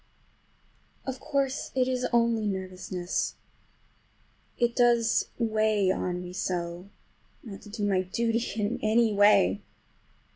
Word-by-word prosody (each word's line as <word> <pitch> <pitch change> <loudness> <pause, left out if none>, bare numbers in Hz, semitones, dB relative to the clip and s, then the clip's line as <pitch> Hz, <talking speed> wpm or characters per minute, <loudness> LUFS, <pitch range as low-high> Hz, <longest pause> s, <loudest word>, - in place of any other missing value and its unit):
Of 265 -1 -4
course 275 0 -1
it 255 -1 +2
is 255 -1 0
only 230 -2 +2
nervousness. 185 -2 -3 1.2
It 240 -1 +1
does 235 -2 +3
weigh 215 -4 +2
on 180 -1 -2
me 180 0 -8
so 175 0 -3 0.5
not 200 -4 -9
to 210 - -13
do 205 0 -2
my 190 -2 +2
duty 230 +5 0 0.2
in 210 +2 -1
any 220 0 +3
way! 200 - +4
215 Hz, 115 wpm, -28 LUFS, 185-235 Hz, 1.2 s, way